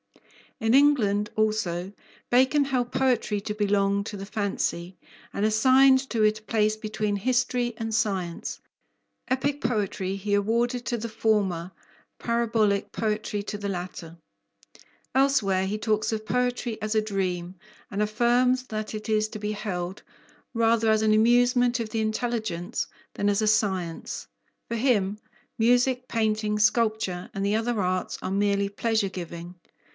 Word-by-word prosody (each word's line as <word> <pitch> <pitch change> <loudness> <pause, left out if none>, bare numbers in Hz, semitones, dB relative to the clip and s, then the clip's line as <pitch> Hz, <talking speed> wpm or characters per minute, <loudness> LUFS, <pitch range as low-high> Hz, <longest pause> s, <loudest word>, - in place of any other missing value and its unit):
In 225 -1 +1
England, 215 -8 +3
also, 200 -4 0 0.4
Bacon 265 +4 +4
held 250 -3 -1
poetry 250 -5 +1
to 210 - -4
belong 200 -1 +1
to 205 - -6
the 195 0 -7
fancy, 190 -3 -2 0.4
and 200 - -2
assigned 260 +4 +5
to 230 - 0
it 215 0 +3
a - - -27
place 215 0 +1
between 215 -1 -2
history 245 +2 0
and 225 -1 -4
science. 190 -5 -2 0.7
Epic 275 +2 -1
poetry 200 -5 -1
he 205 +1 -3
awarded 235 +4 0
to 240 - -1
the 230 +1 -5
former, 200 -6 0 0.5
"parabolic" 225 -4 +1
poetry 215 -1 -2
to 205 - -5
the 200 -1 -3
latter. 175 -3 -6 1.0
Elsewhere 210 -9 +3
he 205 +2 -2
talks 215 0 0
of 215 -1 -3
poetry 245 +1 -1
as 215 +1 -1
a 215 - +3
dream, 185 -4 -3 0.3
and 205 +1 -2
affirms 245 +4 +2
that 215 0 -4
it 215 +1 -6
is 215 0 +2
to 215 - -7
be 210 0 -2
held 190 -3 -4 0.5
"rather 230 -1 +2
as 220 0 +3
an 215 0 +4
amusement 245 +2 +4
of 225 -2 -3
the 220 0 -1
intelligence 220 -4 -2 0.3
than 205 - +1
as 205 +1 +1
a 215 - +1
science." 190 -6 -1 0.4
For 235 - -3
him 210 -5 +1 0.4
music, 245 +2 +2
painting, 215 -2 0
sculpture, 215 -4 +1
and 195 0 -2
the 205 +1 +1
other 225 0 0
arts 185 -1 -1
are - - -3
merely 200 0 +1
pleasure 220 0 0
giving. 170 -1 -7
215 Hz, 145 wpm, -26 LUFS, 200-235 Hz, 1.0 s, assigned